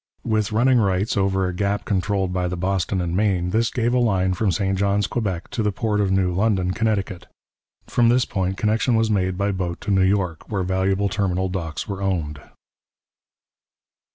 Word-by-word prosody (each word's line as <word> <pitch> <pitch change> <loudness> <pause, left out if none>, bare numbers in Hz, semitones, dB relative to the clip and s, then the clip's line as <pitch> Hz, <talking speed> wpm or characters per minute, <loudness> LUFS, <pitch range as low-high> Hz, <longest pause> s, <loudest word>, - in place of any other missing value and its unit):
With 110 -2 0
running 120 +3 +3
rights 100 0 +1
over 95 -1 +1
a 90 - -3
gap 100 +2 -1
controlled 95 -2 0
by 90 -1 0
the 90 0 -4
Boston 95 +1 -1
and 85 0 -2
Maine, 95 -3 +1
this 115 +2 +2
gave 120 -1 0
a 125 - +3
line 95 -6 +2
from 95 +2 0
St 95 +2 0
Johns, 100 +1 +1
Quebec, 95 -6 -3
to 115 - -2
the 105 -1 +1
port 105 0 -1
of 100 - +1
New 95 -2 +1
London, 95 -2 +1
Connecticut; 100 -4 -2 0.6
from 120 -1 +2
this 125 +1 +3
point 95 -1 -2
connection 115 +3 +1
was 110 0 +2
made 95 -3 0
by 100 +1 0
boat 90 -3 -3
to 105 - -3
New 95 -1 +3
York, 95 -4 0
where 100 -3 0
valuable 95 +2 0
terminal 95 -2 -1
docks 85 -4 -4
were 100 -1 -5
owned. 80 -7 -2
95 Hz, 185 wpm, -22 LUFS, 95-105 Hz, 0.6 s, running